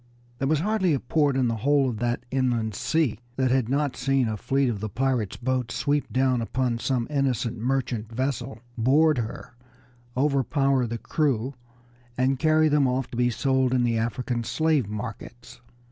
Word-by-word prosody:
There 135 - 0
was 155 0 +2
hardly 190 -5 +1
a - - -1
port 140 +2 +1
in 130 -2 +2
the 115 -1 -1
whole 140 +4 +2
of 110 -4 -5
that 120 +1 -1
inland 120 -5 0
sea 135 0 0 0.2
that 130 -1 +1
had 130 -3 +1
not 140 0 0
seen 135 -3 +1
a 110 - -2
fleet 135 +6 0
of 115 -4 -2
the 110 +1 -4
pirates' 125 -2 -1
boats 125 -1 -2
sweep 145 0 0
down 130 -2 +2
upon 120 0 -1
some 125 -1 0
innocent 130 -5 0
merchant 120 -3 -2
vessel, 130 0 -2 0.2
board 140 +5 +3
her, 115 +1 -6 0.6
overpower 135 -1 +2
the 115 +1 -3
crew, 135 -1 -1 0.6
and 130 +1 +1
carry 155 0 +4
them 145 -2 +3
off 125 0 -1
to - - -6
be 120 +1 +2
sold 130 +1 +1
in 125 - +2
the 115 -2 +1
African 120 +2 -2
slave 155 -4 +1
markets. 115 +2 -8
130 Hz, 175 wpm, -25 LUFS, 120-140 Hz, 0.6 s, carry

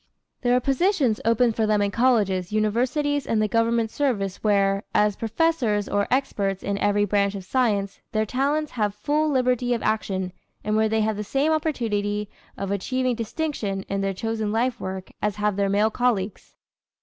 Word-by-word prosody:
There 245 0 +3
are - - +4
positions 275 - +1
open 230 +1 +3
for 220 0 0
them 210 -1 +2
in 200 0 +1
colleges, 205 -7 +2
universities 255 +7 0
and 225 - +1
the 215 - +2
government 230 +1 +1
service 205 -10 -1
where, 200 -1 +2
as 210 -1 +3
professors 225 -3 0
or 205 0 0
experts 200 -7 0
in 200 0 -2
every 205 0 +2
branch 200 0 +1
of 195 - -6
science, 200 -3 0
their 215 -2 +1
talents 285 +6 0
have 210 -4 -1
full 300 +8 0
liberty 250 -2 +1
of 230 - -5
action 190 -4 -1 0.3
and 215 0 0
where 220 0 +3
they 220 0 +1
have 215 -1 0
the 210 - -3
same 275 +8 +1
opportunity 210 -10 -1 0.3
of 195 0 -3
achieving 255 +6 0
distinction 225 -5 -3
in 195 0 -1
their 195 0 0
chosen 220 0 -2
life 235 +2 0
work 190 0 -6
as 210 -1 0
have 210 -1 0
their 200 0 +1
male 210 +2 +2
colleagues. 220 -5 -1
215 Hz, 175 wpm, -24 LUFS, 200-250 Hz, 0.3 s, are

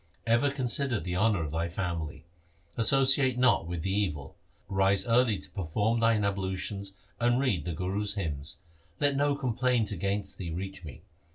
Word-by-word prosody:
Ever 120 +5 +3
consider 130 -2 +1
the 90 -1 -4
honour 100 -2 +2
of 75 - -4
thy 85 +2 -2
family. 85 -4 -4 0.5
Associate 130 +1 +4
not 125 -9 +3
with 85 -2 -4
the 95 - -1
evil. 85 -9 -2 0.3
Rise 95 0 +2
early 115 -2 +3
to - - -10
perform 105 +5 -1
thine 115 -2 +3
ablutions, 100 0 -3 0.3
and 120 +1 +2
read 105 - 0
the 85 - -3
Guru's 100 +5 -2
hymns. 75 -7 -4 0.4
Let 145 -1 +3
no 145 +1 +2
complaint 125 -4 0
against 100 +2 -3
thee 90 -3 -4
reach 95 +3 -6
me. 75 -5 -10
100 Hz, 160 wpm, -29 LUFS, 90-120 Hz, 0.5 s, Associate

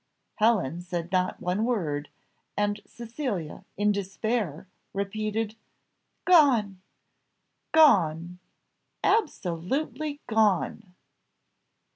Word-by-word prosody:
Helen 205 - +2
said 175 -1 -5
not 185 -1 0
one 180 +4 -1
word, 160 -12 -1 0.5
and 205 0 0
Cecilia, 235 - -5
in 205 +1 +3
despair, 200 -3 -2 0.3
repeated, 215 +2 -2 0.7
"Gone! 245 - +4 0.9
gone! 180 - +4 0.6
absolutely 285 - -1
gone! 215 -3 +1
205 Hz, 70 wpm, -27 LUFS, 180-235 Hz, 0.9 s, Gone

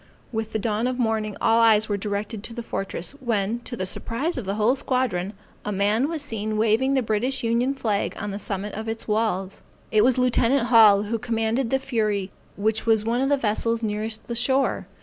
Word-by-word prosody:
With 220 -1 -3
the - - -1
dawn 220 +2 -1
of 255 -1 -2
morning, 220 -3 -1
all 225 +1 +3
eyes 220 -1 +5
were 205 - 0
directed 205 +1 -3
to 230 - -8
the 235 - -5
fortress, 195 -5 -4
when, 230 -2 -1
to 240 0 -7
the 185 - -2
surprise 250 - -3
of 250 - -4
the 195 +1 -2
whole 220 +5 +3
squadron, 230 -8 -1 0.3
a 210 - -3
man 210 +7 +1
was 320 -3 -3
seen 215 -5 -3
waving 225 +5 +2
the 260 - +2
British 245 +5 -1
Union 240 +4 +1
flag 220 -7 -1
on 205 - -4
the 200 - -5
summit 205 -1 -4
of 220 +2 -5
its 225 0 -4
walls. 210 -3 -1 0.3
It 215 -1 +4
was 255 +1 +3
lieutenant 250 0 +2
Hall, 215 -4 +7
who 225 +2 -2
commanded 230 +1 -1
the 265 - +2
Fury 215 -7 -1 0.3
which 220 +2 0
was 220 -2 +3
one 235 +2 +1
of 270 - +1
the 285 - +3
vessels 230 0 0
nearest 215 +1 -3
the 235 - -4
shore. 260 +3 +1
225 Hz, 210 wpm, -24 LUFS, 210-245 Hz, 0.3 s, Hall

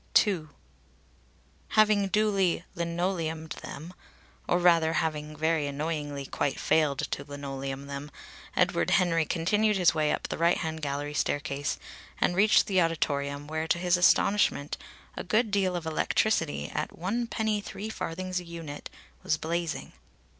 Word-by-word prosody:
II. 180 -7 -2 1.2
Having 215 -2 +4
duly 195 -4 +2
"linoleumed 170 -2 -2
them," 160 +6 -8 0.6
or 175 - +4
rather 170 -2 +4
having 155 -2 -1
very 160 -1 +1
annoyingly 145 -1 -3
quite 140 +1 -2
failed 150 -3 +2
to 140 - -2
"linoleum 140 -1 -5
them," 140 +1 -6 0.5
Edward 85 - +2
Henry 165 -4 +2
continued 210 +6 +2
his 180 -3 +4
way 155 -1 +1
up - - -2
the - - -4
right 170 +1 +4
hand 160 0 -3
gallery 145 0 -3
staircase 145 -1 -1 0.4
and 175 - +2
reached 210 +3 +5
the 190 -2 +2
auditorium, 145 -3 -1
where 155 +1 -3
to 170 - +2
his 175 0 +2
astonishment 180 -4 +3 0.4
a - - -4
good 215 +4 +1
deal 190 -3 +1
of 170 -2 -3
electricity, 160 +1 +1
at - - -3
one 220 +8 -1
penny 220 -2 0
three 205 +1 -6
farthings 185 -1 -3
a - - -8
unit, 165 -4 -7 0.3
was 155 - +1
blazing. 165 0 -3
165 Hz, 140 wpm, -28 LUFS, 150-185 Hz, 1.2 s, reached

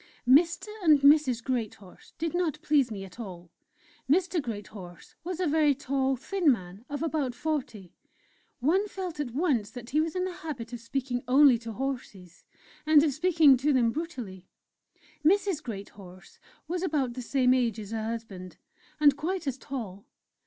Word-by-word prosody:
Mr. 335 - +4
and 305 -5 +5
Mrs. 280 -5 +4
Greathorse 220 -7 -5
did 325 -1 -2
not 350 -4 0
please 290 -7 +3
me 200 -3 -6
at 190 +4 -15
all. 180 -6 -9 0.6
Mr. 355 +2 +2
Greathorse 205 -7 -9
was 355 0 -5
a 370 - +1
very 300 -2 +3
tall, 270 -1 0
thin 315 +4 +1
man 190 -2 -5
of 290 +2 -4
about 295 -6 -1
forty; 245 - -4 0.7
one 370 +10 +2
felt 365 -6 -6
at 290 -4 -2
once 255 - 0
that 245 -1 -10
he 305 +3 +3
was 320 +1 -3
in 365 0 0
the 365 -1 -5
habit 250 -7 -6
of 240 - -5
speaking 245 +1 -3
only 265 -2 +6
to 230 -1 -7
horses 240 -8 -6 0.4
and 305 -1 +6
of 300 -3 +1
speaking 315 -3 +5
to 285 +4 +1
them 240 -4 +3
brutally! 240 - -6 0.8
Mrs. 380 0 +2
Greathorse 195 -5 -10 0.3
was 350 +2 -2
about 295 -9 -1
the 255 - -6
same 255 +1 +2
age 235 -4 0
as 210 -1 -8
her 220 -1 -3
husband, 220 -5 -6 0.4
and 290 -2 +6
quite 345 +5 -3
as 270 -1 -3
tall. 220 -9 -7
270 Hz, 165 wpm, -28 LUFS, 230-315 Hz, 0.8 s, only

